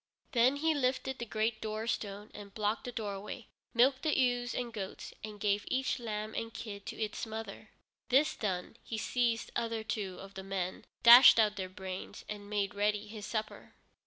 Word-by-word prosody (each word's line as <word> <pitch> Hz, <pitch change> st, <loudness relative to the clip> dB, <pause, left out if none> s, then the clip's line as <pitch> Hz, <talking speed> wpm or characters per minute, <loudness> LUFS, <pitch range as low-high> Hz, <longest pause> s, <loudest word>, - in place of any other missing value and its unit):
Then 250 Hz, +3 st, +4 dB
he 320 Hz, +3 st, +2 dB
lifted 265 Hz, -1 st, 0 dB
the 235 Hz, -, -4 dB
great 220 Hz, +1 st, -1 dB
doorstone 215 Hz, -2 st, -3 dB
and 200 Hz, -1 st, -10 dB
blocked 215 Hz, +1 st, -1 dB
the 245 Hz, -, -4 dB
doorway, 210 Hz, 0 st, -5 dB, 0.3 s
milked 260 Hz, +3 st, +4 dB
the 310 Hz, -2 st, +1 dB
ewes 245 Hz, -2 st, +1 dB
and 240 Hz, -2 st, -3 dB
goats, 195 Hz, -3 st, -6 dB
and 210 Hz, -1 st, -7 dB
gave 205 Hz, 0 st, +1 dB
each 260 Hz, 0 st, 0 dB
lamb 215 Hz, -2 st, -4 dB
and 225 Hz, 0 st, -3 dB
kid 210 Hz, -3 st, -7 dB
to -, -, -6 dB
its 215 Hz, -1 st, -3 dB
mother. 220 Hz, -1 st, -7 dB, 0.4 s
This 275 Hz, +4 st, +4 dB
done, 190 Hz, 0 st, -3 dB
he 225 Hz, -, -4 dB
seized 235 Hz, 0 st, 0 dB
other 230 Hz, -1 st, -1 dB
two 200 Hz, -4 st, -3 dB
of 195 Hz, 0 st, -10 dB
the 190 Hz, -, -6 dB
men, 190 Hz, -1 st, -3 dB, 0.2 s
dashed 240 Hz, +2 st, +11 dB
out 210 Hz, -2 st, +4 dB
their 190 Hz, -2 st, -4 dB
brains, 185 Hz, 0 st, -7 dB
and 205 Hz, -1 st, -7 dB
made 205 Hz, -2 st, 0 dB
ready 210 Hz, +1 st, +1 dB
his 210 Hz, -1 st, -8 dB
supper. 215 Hz, -1 st, -4 dB
215 Hz, 180 wpm, -32 LUFS, 205-240 Hz, 0.4 s, dashed